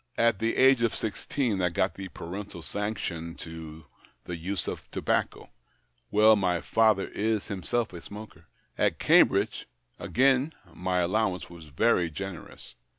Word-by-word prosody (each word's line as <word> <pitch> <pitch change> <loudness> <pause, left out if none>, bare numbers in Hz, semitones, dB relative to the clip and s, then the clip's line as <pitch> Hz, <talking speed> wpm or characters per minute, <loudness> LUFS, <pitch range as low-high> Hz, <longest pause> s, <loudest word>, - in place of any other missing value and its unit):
At 115 -4 +3
the 115 +1 0
age 130 -2 +6
of 115 -2 +1
sixteen 110 -1 -2
I 90 - +2
got 95 +3 0
the 95 -1 -7
parental 90 0 -7
sanction 85 -2 -4
to 80 -2 -9 0.4
the 90 - -5
use 90 +3 -3
of - - -6
tobacco - - -1 0.3
— - - -44
well, 110 +1 +6
my 90 -4 +1
father 110 +1 +2
is 110 0 -1
himself 110 +3 -2
a 85 - -8
smoker. 100 -6 -11 0.3
At - - +2
Cambridge, - - +3 0.3
again, 135 +4 +2 0.2
my 90 0 0
allow 95 +2 +1
ance 90 - -10
was 85 -2 -11
very 85 +4 +2
generous. 95 +2 -8
95 Hz, 150 wpm, -28 LUFS, 85-110 Hz, 0.4 s, age